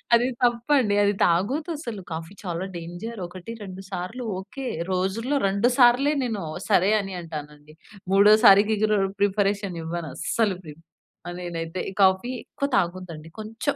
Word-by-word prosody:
అది 240 +2 +3 0.2
తప్పండి 240 -2 +2
అది 205 - +3
తాగొద్దు 250 - +1
అసలు 235 -9 -6
కాఫీ 165 +4 -7
చాలా 175 0 -3
డేంజర్ 175 +6 -7
ఒకటి 185 +5 -9
రెండు 190 -1 -8
సార్లు 190 +7 -5
ఓకే. 255 +8 -7 0.2
రోజుల్లో 205 +10 0
రెండు 200 +5 +2
సార్లే 255 +4 +5
నేను 220 -7 -2 0.3
సరే 190 +3 +4
అని 195 -2 -6
అంటానండి. 150 -2 -9 0.4
మూడోసారికి 210 +1 +7
ఇకరు 215 -1 +2 0.2
ప్రిపరేషన్ 200 -2 +1
ఇవ్వను 165 0 -4
అస్సలు 210 -5 0
ప్రిప్ 155 0 -12 0.4
ఆ! - - -3
నేనైతే 170 0 -4 0.2
కాఫీ 190 +5 +3 0.2
ఎక్కువ 280 - -3
తాగొద్దండి. 170 -3 -3
కొంచెం 225 +6 -3
195 Hz, 135 wpm, -25 LUFS, 175-230 Hz, 0.4 s, మూడోసారికి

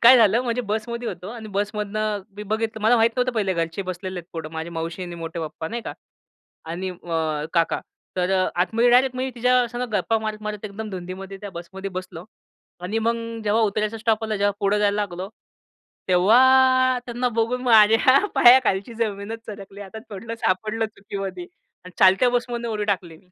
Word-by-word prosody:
काय 250 +2 +9
झालं, 225 0 +5
म्हणजे 245 0 -1
बसमध्ये 230 +3 -3
होतो 185 - -7
आणि 225 -2 -8
बसमधनं 210 0 -2
मी 210 - -6
बघितलं 220 +1 -2
मला 235 +3 +5
माहीत 225 +1 +4
नव्हतं 250 0 +1
पहिले 200 -5 0
घरचे 165 +2 -2
बसलेले 185 0 -5
आहेत 170 - -23
पुढं 160 -2 -6
माझी 160 +1 -5
मावशी 165 +2 -4
आणि 175 -1 -6
मोठे 165 0 -6
पप्पा 160 0 -5
नाही 235 +4 -4
का. - - -5 0.7
आणि 175 +4 -4
अ, 160 -4 -2
काका. 170 -2 +1 0.4
तर 180 0 0
अ, 185 -1 +2
आतमध्ये 230 +6 +3
डायरेक्ट 255 +1 +4
मी 260 +1 -2
तिच्यासंगं 245 0 +1
गप्पा 210 +3 +1
मारत, 215 -1 -4
मारत 210 0 -5
एकदम 215 +1 -6
धुंदीमध्ये 190 +1 -7
त्या 205 - -7
बसमध्ये 190 +3 -7
बसलो. 185 -2 -9 0.6
आणि 190 +5 -2
मग 230 +1 +1 0.3
जेव्हा 215 +2 +2
उतरायचा 215 +1 0
स्टॉप 220 0 +1
आला. 220 -1 -2
जेव्हा 205 0 +2
पुढं 200 +1 +2
जायला 205 -1 +2
लागलो, 185 -2 -4 0.8
तेव्हा 255 +7 +5
त्यांना 245 +1 -1
बघून 235 +2 0
माझ्या 225 +2 +6 0.2
पायाखालची 240 -3 +5
जमीनच 220 0 -3
सरकली. 200 -1 -9
आता 200 +2 -8
म्हंटलो 225 +3 -6
सापडलं 220 +2 0
चुकीमध्ये 195 -3 -6 0.4
आणि 180 - -11
चालत्या 190 +6 +6
बसमधनं 240 -1 -2
उडी 210 -2 -2
टाकली. 180 -5 -2
210 Hz, 170 wpm, -23 LUFS, 185-230 Hz, 0.8 s, काय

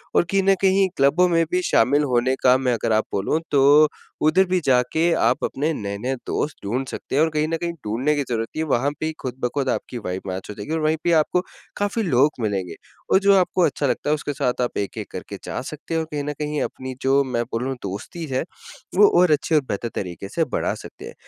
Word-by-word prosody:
और - - +5
कहीं 195 -1 +2
न 195 0 +4
कहीं 190 0 +4
क्लबों 145 +7 +4
में 165 -1 +3
भी 180 0 +2
शामिल 140 +6 +4
होने 130 +2 +2
का, 130 0 +6
मैं 130 -2 0
अगर 115 - -1
आप 110 - +2
बोलूँ 100 +11 0
तो, 145 +2 +6 0.4
उधर 185 +5 +4
भी 185 0 +1
जाके 135 +6 +2
आप 120 +3 +2
अपने 150 +4 -1
नए-नए 105 +4 -3
दोस्त 150 - -2
ढूँढ़ 125 +7 -1
सकते - - -5
हैं। 145 - +4
और 160 - +2
कहीं 155 0 +1
न 165 0 -1
कहीं 170 0 -2
ढूँढ़ने 125 +8 0
की 145 - 0
ज़रूरत 115 -1 -1
नहीं 155 - -1
है, 160 - -5
वहाँ 130 +3 +2
पे 155 - -2
ही 160 - -1
खुद-ब-खुद 130 +1 -2
आपकी 125 - -3
वाइब 95 -4 -4
मैच 95 +1 -5
हो - - -4
जाएगी 105 +9 -7
और 160 - 0
वहीं 155 +1 +1
पे 175 - +1
ही - - +4
आपको 160 +3 +2 0.4
काफ़ी 205 +3 -1
लोग 145 -5 +4
मिलेंगे 100 -5 -2 0.4
और 190 - +6
जो 200 0 +4
आपको 185 0 +2
अच्छा 145 -2 +1
लगता 145 - -1
है, - - +4
उसके 145 -1 -4
साथ 125 -1 -1
आप 120 - -2
एक-एक 100 - -4
करके - - -7
जा - - -4
सकते 155 +4 -7
हैं 165 - +2
और 160 - -4
कहीं 145 -1 -2
न 150 +1 -3
कहीं 150 0 -2
अपनी 130 0 -4
जो, 135 +1 +3
मैं 120 -3 -1
बोलूँ, 125 +4 -2
दोस्ती 100 - -6
है, 130 -2 -1 0.5
वो 205 +1 +7
और 180 -3 +5
अच्छे 155 +2 +2
और 150 - +5
बेहतर 110 +4 -2
तरीके 90 0 -5
से 165 - 0
बढ़ा 130 - -1
सकते - - -11
हैं। - - -9
140 Hz, 240 wpm, -22 LUFS, 125-160 Hz, 0.5 s, वो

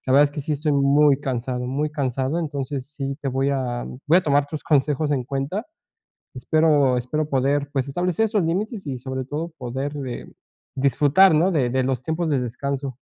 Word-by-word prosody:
la 130 - +1
verdad 145 +2 +7
es 140 - -1
que 145 - -5
sí 150 +2 -3
estoy 150 +1 0
muy 140 0 +4
cansado, 125 -1 -3
muy 145 +4 -1
cansado, 135 0 -1
entonces 140 -4 -3
sí 140 -2 -4
te 140 - -2
voy 135 +1 0
a 125 -3 -2 0.2
voy 160 - +5
a - - -1
tomar 145 -1 +2
tus 155 0 -6
consejos 150 0 +1
en 130 -3 -1
cuenta. 140 - -3 0.7
Espero 145 -1 +3
espero 145 +5 -2
poder, 140 +1 +1
pues, 135 -1 -1
establecer 180 +8 0
esos 215 -2 +1
límites 195 - -2
y 130 -3 -3
sobre 130 +1 -4
todo 155 +5 -4
poder, 135 +4 -4
eh, 120 - -6 0.5
disfrutar, 145 +6 +4
¿no?, 170 +5 +3
de 135 -9 +1
de 130 +1 +1
los 130 0 -1
tiempos 160 +2 -1
de 140 -3 +2
descanso. 135 +2 -4
140 Hz, 190 wpm, -23 LUFS, 130-155 Hz, 0.7 s, verdad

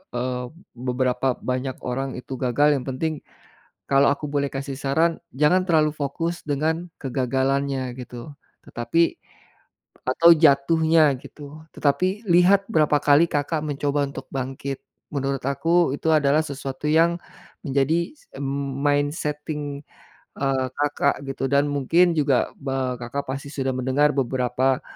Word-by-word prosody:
eee, 125 0 -2 0.3
beberapa 125 +1 0
banyak 130 +1 -3
orang 130 +1 -3
itu 130 +1 -7
gagal, 135 +4 +2
yang 130 - -5
penting, 150 +3 -2 0.7
kalau 140 0 +5
aku 150 +1 -6
boleh 140 -1 0
kasih 135 0 -5
saran 160 +5 +1 0.2
jangan 150 +7 +3
terlalu 155 -3 +3
fokus 165 +4 -3
dengan 160 +4 -1
kegagalannya 135 0 -1
gitu, 125 +3 -8 0.4
tetapi 140 +9 0 0.9
atau 165 +7 +5
jatuhnya 160 +1 +4
gitu, 150 +1 -11
tetapi, 185 +9 0
lihat 185 +3 +5
berapa 150 -3 +3
kali 145 +3 +5
Kakak 145 +2 -1
mencoba 145 0 0
untuk 135 -1 -8
bangkit, 135 +1 -4 0.3
menurut 135 -1 -1
aku 165 +2 +2
itu 160 - -1
adalah 145 0 +3
sesuatu 140 -2 -6
yang 165 +2 +4 0.5
menjadi 140 - +1 0.7
mindsetting 145 0 -1 0.6
eee, 135 -1 +1
Kakak 145 -1 0
gitu 135 0 -4
dan 140 +1 +3
mungkin 165 +5 +3
juga 140 -4 +2
ba 135 -2 -2
Kakak 125 +4 -5
pasti 140 +2 -5
sudah 135 -2 -1
mendengar 130 +3 +2
beberapa 130 0 +1
140 Hz, 125 wpm, -23 LUFS, 130-155 Hz, 0.9 s, kalau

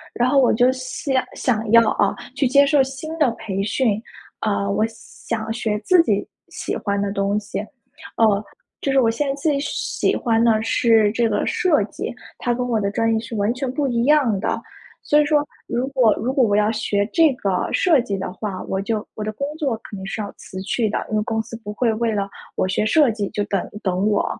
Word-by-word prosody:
然 245 +1 +2
后 280 +1 +3
我 250 - +4
就 245 +3 +4
想 260 +1 -4 0.2
想 220 -3 -1
要 230 -1 +7
啊， 200 - +1 0.2
去 280 -1 +1
接 280 +2 +5
受 280 -1 +4
新 270 +5 -6
的 295 -5 +4
培 195 -4 -4
训。 215 0 +1 0.4
呃， 200 -2 0
我 215 +2 +1
想 225 0 -6
学 220 -2 -1
自 360 -2 +5
己 205 -10 0 0.2
喜 - - -4
欢 200 -1 -1
的 200 0 -1
东 200 +1 0
西， 205 -1 -5 0.6
哦， 215 -2 +3 0.4
就 275 - -1
是 270 - +3
我 230 -3 +3
现 275 +5 -1
在 275 - 0
最 280 0 0
喜 - - -1
欢 230 -2 +1
的 220 -2 +3
是 225 -2 +3
这 230 -1 +1
个 - - 0
设 365 -9 +2
计。 - - -6 0.2
它 240 -1 0
跟 250 0 -2
我 230 -3 0
的 200 -1 0
专 225 +2 +1
业 220 - +1
是 230 0 -8
完 205 +2 +1
全 255 0 -3
不 280 +2 -1
一 235 -2 0
样 265 -9 +3
的， - - -1 0.4
所 295 0 +4
以 295 - +2
说 295 -1 +2 0.2
如 240 +2 -1
果 250 -6 +3
如 255 +3 -2
果 270 - +2
我 205 -3 +3
要 210 +1 +2
学 205 -2 0
这 320 -5 +4
个 195 -7 -1
设 330 -7 +4
计 205 -4 -3
的 190 -1 -4
话， 195 -2 -5
我 190 - -2
就 215 +1 -2
我 215 - -6
的 215 - -2
工 280 +5 -3
作 270 -7 0
肯 - - -10
定 190 - -7
是 215 - -3
要 200 - -6
辞 190 - -9
去 220 +3 0
的。 210 - -3
因 215 - 0
为 - - +1
公 220 -1 -1
司 230 - -11
不 210 -2 -8
会 230 0 +1
为 230 +1 0
了 205 -2 -1 0.3
我 - - +1
学 190 +3 0
设 290 +2 +4
计 210 -3 -3
就 205 - -2
等 200 -2 -1 0.2
等 190 +2 +1
我， 205 - +1
225 Hz, 245 characters per minute, -21 LUFS, 205-265 Hz, 0.6 s, 要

